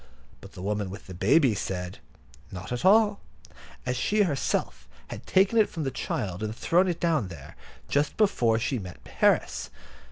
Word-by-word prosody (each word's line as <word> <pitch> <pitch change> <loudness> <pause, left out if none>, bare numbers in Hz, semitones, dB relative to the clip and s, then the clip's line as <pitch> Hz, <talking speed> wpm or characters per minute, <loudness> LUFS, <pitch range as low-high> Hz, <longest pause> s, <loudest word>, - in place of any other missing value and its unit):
but - - -13
the 90 - -9
woman 105 -1 -2
with 100 +4 -9
the 95 - -9
baby 135 - +3
said, 90 -2 -4 0.5
"Not 90 +3 -8
at 125 - -3
all," 205 +1 +5 0.7
as 125 0 -1
she 205 +11 +2
herself 145 -8 -2 0.2
had - - -8
taken 195 +4 +4
it 215 - +4
from 160 - -4
the 135 - -2
child, 95 -5 -3
and 110 0 -3
thrown 180 +8 +2
it 175 -2 -2
down 160 - +1
there, 85 -6 -11 0.3
just 145 +1 0
before 120 - +3
she 120 +2 -1
met 90 -3 -9 0.2
Harris. - - +2
125 Hz, 170 wpm, -27 LUFS, -, 0.7 s, all